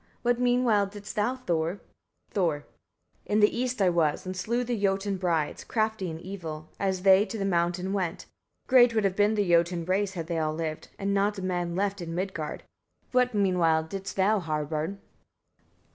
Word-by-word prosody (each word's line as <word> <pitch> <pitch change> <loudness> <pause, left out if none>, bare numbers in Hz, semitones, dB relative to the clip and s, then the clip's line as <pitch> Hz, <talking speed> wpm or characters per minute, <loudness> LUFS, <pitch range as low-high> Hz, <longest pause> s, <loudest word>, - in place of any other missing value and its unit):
What 240 0 +2
meanwhile 245 -5 +3
didst 205 +1 -9
thou, 215 +5 +1
Thor? 175 -6 -1 0.5
Thor. 165 -7 0 0.6
23. - - -3
In - - +4
the 210 0 +4
east 250 -3 0
I 185 - +5
was, 165 -2 +1
and 185 0 -4
slew 235 +6 -1
the 245 0 -2
Jotun 195 -1 0
brides, 170 -5 -1
crafty 220 -4 -1
in 160 0 -6
evil, 165 -4 -7
as 190 -2 -1
they 195 0 +7
to 225 - -5
the 195 - -2
mountain 180 +1 0
went. 185 -3 -2 0.4
Great 245 -3 +5
would 220 - +2
have 195 -2 +1
been 210 +2 +3
the 205 -2 +1
Jotun 170 0 +2
race, 190 +2 0
had 170 -4 -4
they 165 0 -2
all 155 -1 -1
lived; 160 -1 -4
and 200 0 -1
not 200 +1 +1
a 190 - -5
man 175 -2 -2
left 200 0 -1
in 165 -1 -5
Midgard. 180 -5 -4 0.5
What 250 -2 +2
meanwhile 175 -5 +3
didst 195 +4 -6
thou, 200 +2 +3
Harbard? 155 +2 -2
190 Hz, 185 wpm, -27 LUFS, 170-205 Hz, 0.6 s, they